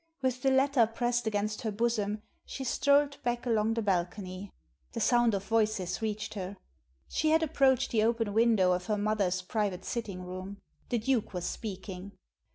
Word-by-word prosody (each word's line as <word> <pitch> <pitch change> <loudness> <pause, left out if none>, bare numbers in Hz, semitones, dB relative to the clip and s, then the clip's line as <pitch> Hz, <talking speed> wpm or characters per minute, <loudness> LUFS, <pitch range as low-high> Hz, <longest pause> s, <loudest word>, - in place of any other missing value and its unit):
With 255 -1 0
the 270 - +3
letter 265 -3 +4
pressed 240 +1 -1
against 210 0 -1
her 220 - -1
bosom 210 -1 -1 0.2
she 270 - -6
strolled 280 +3 +2
back 240 0 -2
along 225 -1 +1
the 230 - -1
bal 190 -4 +3
cony. 185 0 -8 0.4
The - - -3
sound 240 -3 +3
of 195 - -3
voices 215 -5 0
reached 215 0 -3
her. 195 -1 -5 0.5
She 310 - 0
had 320 +1 +4
approached 270 -4 +2
the 220 - +3
open 225 -2 +1
window 220 -5 +4
of 180 0 -1
her 210 - +1
mother's 200 -3 0
private 200 -2 -2
sitting 200 -6 -4
room. 185 +2 -7 0.3
The 240 - +1
Duke 230 -3 0
was 175 -1 -3
speaking. 195 -2 -6
215 Hz, 170 wpm, -30 LUFS, 195-240 Hz, 0.5 s, letter